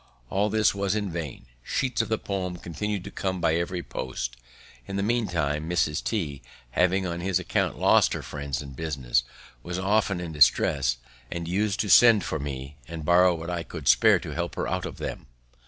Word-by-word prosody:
All 100 +2 +1
was 100 -2 +1
in 105 -3 -2
vain; 80 -7 -5 0.2
sheets 125 - 0
of 115 - -4
the 110 - +1
poem 90 -4 -3
continued 95 +4 -4
to 100 - -8
come 95 -2 -2
by 85 -2 +2
every 85 +1 -1
post. - - -4 0.5
In 95 - -5
the 100 - 0
meantime, 85 -10 0
Mrs. 75 -4 +1
T, 75 - -2 0.3
having 95 +5 +2
on 85 -1 -3
his 90 0 +1
account 90 - -1
lost - - +4
her - - -4
friends 70 -1 -4
and 70 -2 -10
business, 65 -6 0 0.4
was 90 +4 -5
often 100 0 +1
in 85 -2 -5
distresses, 70 -3 +3 0.3
and 85 -1 -4
us'd 100 +3 0
to 105 - -2
send 115 -1 +7
for 80 - -3
me 70 0 -6
and 80 -2 -6
borrow 90 +1 +5
what 85 +2 -5
I 85 -1 -2
could 80 - -8
spare - - +6
to - - -6
help - - -3
her - - -2
out - - -2
of - - -9
them. - - -6
90 Hz, 190 wpm, -26 LUFS, 75-100 Hz, 0.5 s, send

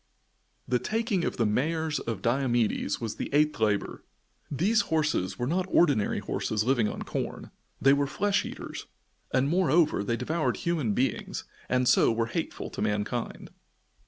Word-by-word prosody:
The 125 0 +1
taking 215 - -1
of - - -2
the 115 - +2
mares 155 +8 0
of 110 -5 -5
Diomedes 120 -4 +1
was 115 -3 -4
the - - -4
eighth 150 0 +2
labor. 105 -2 0 0.5
These 200 - +2
horses 150 - 0
were 120 - -1
not 180 +7 0
ordinary 145 - +3
horses, 110 -1 -1
living 120 -3 +2
on - - -5
corn. - - -5 0.3
They 135 0 +5
were 140 0 +1
flesh 200 +7 +1
eaters, - - -7 0.4
and 130 +1 +2
moreover, 165 - +3
they 115 +3 -1
devoured 155 +7 -1
human 155 - -1
beings, 125 -2 -1 0.3
and 125 0 +2
so - - +5
were 115 0 0
hateful 115 - -4
to - - -6
mankind. 105 +3 -2
135 Hz, 155 wpm, -28 LUFS, 115-160 Hz, 0.5 s, They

